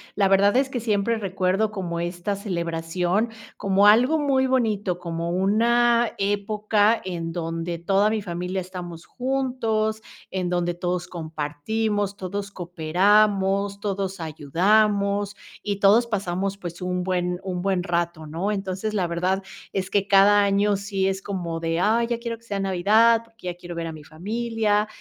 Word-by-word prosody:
la 200 -1 +3
verdad, 200 +4 +4
es 270 - +3
que 255 - -3
siempre 220 0 0
recuerdo 195 +1 0
como 175 -4 -4
esta 175 +3 -2
celebración 175 +2 -1 0.3
como 200 +1 +2
algo 245 +9 +6
muy 270 -3 +2
bonito, 215 -8 0
como 170 -1 -4
una 235 +5 +3
época 210 +2 +1
en 170 -3 -4
donde 165 0 -3
toda 195 +5 +2
mi 215 -1 -1
familia 180 +1 -3
estamos 175 -2 -7
juntos, 245 -5 -1 0.3
en 185 -2 -2
donde 175 -1 0
todos 180 0 -2
compartimos, 185 +6 -2
todos 200 +2 -4
cooperamos, 195 +3 +2
todos 195 -2 -3
ayudamos 200 +6 +1 0.3
y 205 -1 -2
todos 210 +4 +5
pasamos, 195 -2 -2
pues, 175 -3 -8
un 180 0 -2
buen 180 -1 -1
un 180 -2 -3
buen 190 -1 0
rato, 170 -2 -2
¿no? 165 +7 -2
Entonces, 195 +1 -3
la 185 -4 +1
verdad 180 +3 -1 0.3
es 190 -1 -2
que 200 -1 +1
cada 205 +1 +6
año 200 +1 +2
sí 195 -1 -1
es 195 0 -2
como 175 -5 -4
de: 165 0 -1
"Ay, 225 +5 +2
ya 235 0 -1
quiero 235 -1 -4
que 230 +1 -24
sea 205 - -2
Navidad, 210 +5 +4
porque 225 -4 -12
ya 175 - -3
quiero 175 -1 -8
ver 165 0 -3
a 165 - -4
mi 155 -1 -10
familia". 215 +4 -1
195 Hz, 155 wpm, -24 LUFS, 175-215 Hz, 0.3 s, algo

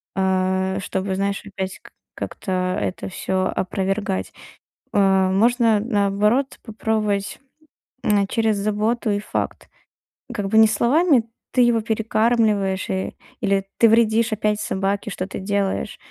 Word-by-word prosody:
а, 190 0 +1
чтобы, 190 0 -2
знаешь, 200 +1 -1
опять 190 -2 -5
как - - -17 0.2
как-то 185 -2 -2
это 185 - -3
всё 185 0 -1
опровергать. 190 - -2 0.6
Э, 190 -2 +3
можно 225 +2 +3
наоборот 210 +4 +1
попробовать, 215 -3 -2 0.6
м, 205 -2 +2
через 220 -1 +1
заботу 215 +3 0
и 205 - +1
факт. 205 - -4 0.7
Как 205 -4 -3
бы 220 - +2
не 220 0 +8
словами: 255 - +3 0.3
"Ты 255 - +3
его 240 -1 +4
перекармливаешь" 215 -3 +1
и 190 0 -2 0.2
или 195 -1 +1
"Ты 230 - +6
вредишь 225 0 +3
опять 210 0 0
собаке, 200 +1 -2
что 185 0 -4
ты 190 - -6
делаешь". 195 - -1
205 Hz, 125 wpm, -22 LUFS, 190-220 Hz, 0.7 s, не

